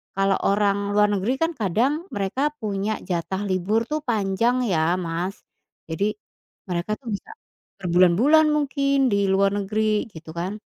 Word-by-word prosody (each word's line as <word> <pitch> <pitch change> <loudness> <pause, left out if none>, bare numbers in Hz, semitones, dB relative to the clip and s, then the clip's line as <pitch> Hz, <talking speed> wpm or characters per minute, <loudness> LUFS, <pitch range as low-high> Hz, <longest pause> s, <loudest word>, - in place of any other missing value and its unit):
kalo 195 0 +2
orang 200 0 +1
luar 210 0 +5
negeri, 205 +7 -1
kan, 325 +1 +1
kadang 245 - 0
mereka 215 +9 -1
punya 210 0 -2
jatah 185 +2 -3
libur, 200 +5 0
tuh, 305 0 -3
panjang, 230 +1 +1
ya, 175 -1 +1
Mas, 175 +3 -3 0.5
jadi 195 +6 -1 0.6
mereka, 175 +3 -2
tuh, 260 - -16
bisa - - -11 0.5
berbulan-bulan 185 - +4
mungkin 280 -2 +1
di 200 0 +2
luar 195 +1 +3
negeri 210 +1 0
gitu, 160 0 -10
kan. 180 +5 -3
200 Hz, 140 wpm, -23 LUFS, 185-240 Hz, 0.6 s, luar